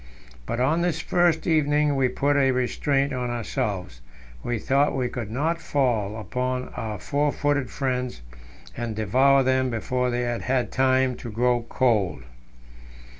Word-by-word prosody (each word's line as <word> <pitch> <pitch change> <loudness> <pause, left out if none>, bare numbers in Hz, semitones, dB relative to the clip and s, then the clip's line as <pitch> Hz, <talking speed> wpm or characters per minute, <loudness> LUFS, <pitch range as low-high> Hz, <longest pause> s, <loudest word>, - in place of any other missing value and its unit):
But 115 - -2
on 150 +7 +2
this 175 -2 0
first 175 -2 +1
evening 150 -2 +2
we 135 -1 +2
put 145 +3 0
a 135 -2 +3
restraint 135 +2 0
on 125 -1 -2
ourselves; 100 - -3 0.4
we 120 -1 -2
thought 140 +7 +1
we 125 -2 -1
could 120 -5 -5
not 160 +8 -1
fall 115 -7 0
upon 125 +4 -3
our 110 -2 -4
four 145 +9 0
footed 145 -3 0
friends 125 - -3 0.5
and 120 -2 -4
devour 130 +6 +3
them 130 0 +2
before 125 +2 -1
they 120 0 -1
had 120 -1 -2
had 130 -1 0
time 130 -1 +2
to 120 - -7
grow 120 +1 0
cold. 105 - +1
130 Hz, 150 wpm, -25 LUFS, 120-140 Hz, 0.5 s, a